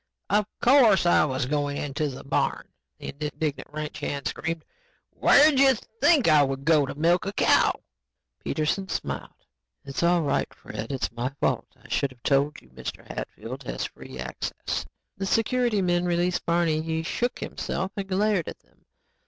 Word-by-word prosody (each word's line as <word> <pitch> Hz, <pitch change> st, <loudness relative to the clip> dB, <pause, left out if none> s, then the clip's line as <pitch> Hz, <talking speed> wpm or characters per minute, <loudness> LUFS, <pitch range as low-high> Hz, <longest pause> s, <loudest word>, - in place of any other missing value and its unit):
"Of 210 Hz, 0 st, +3 dB, 0.2 s
course 240 Hz, -8 st, +6 dB
I 175 Hz, -, +5 dB
was 130 Hz, -3 st, -1 dB
going 145 Hz, +1 st, -1 dB
into 145 Hz, +1 st, -2 dB
the 130 Hz, -, -8 dB
barn," 140 Hz, -, -1 dB, 0.3 s
the -, -, -7 dB
indignant 150 Hz, 0 st, -3 dB
ranch 155 Hz, 0 st, -5 dB
hand 140 Hz, -2 st, -3 dB
screamed. 165 Hz, -1 st, -3 dB, 0.5 s
"Where'd 290 Hz, -1 st, +5 dB
you 270 Hz, -1 st, +6 dB
think 275 Hz, -, +2 dB
I 155 Hz, -2 st, +6 dB
would 135 Hz, 0 st, -1 dB
go 155 Hz, -4 st, +4 dB
to -, -, -5 dB
milk 170 Hz, +5 st, +2 dB
a -, -, -1 dB
cow?" -, -, +3 dB, 0.6 s
Peterson 175 Hz, +5 st, -1 dB
smiled. -, -, -5 dB, 0.4 s
"It's 135 Hz, -1 st, -4 dB
all 170 Hz, 0 st, +3 dB
right, 145 Hz, -, 0 dB
Fred. 110 Hz, +3 st, -7 dB
It's 135 Hz, -2 st, -2 dB
my 120 Hz, +2 st, -2 dB
fault. -, -, 0 dB
I -, -, -17 dB
should 140 Hz, -, 0 dB
have 125 Hz, -2 st, -19 dB
told 140 Hz, +1 st, +2 dB
you 65 Hz, -, -21 dB
Mr. 65 Hz, 0 st, -7 dB
Hatfield -, -, -6 dB
has -, -, -3 dB
free -, -, -10 dB
access." 65 Hz, 0 st, -4 dB, 0.3 s
The 195 Hz, 0 st, -3 dB
security 225 Hz, -1 st, +1 dB
men 175 Hz, 0 st, +1 dB
released 175 Hz, +1 st, 0 dB
Barney. 170 Hz, -2 st, +2 dB
He 160 Hz, 0 st, -2 dB
shook 240 Hz, +9 st, -1 dB
himself 185 Hz, +2 st, -4 dB
and 200 Hz, -2 st, -4 dB
glared 195 Hz, -2 st, +1 dB
at -, -, -6 dB
them. -, -, -34 dB
160 Hz, 170 wpm, -26 LUFS, 140-195 Hz, 0.6 s, course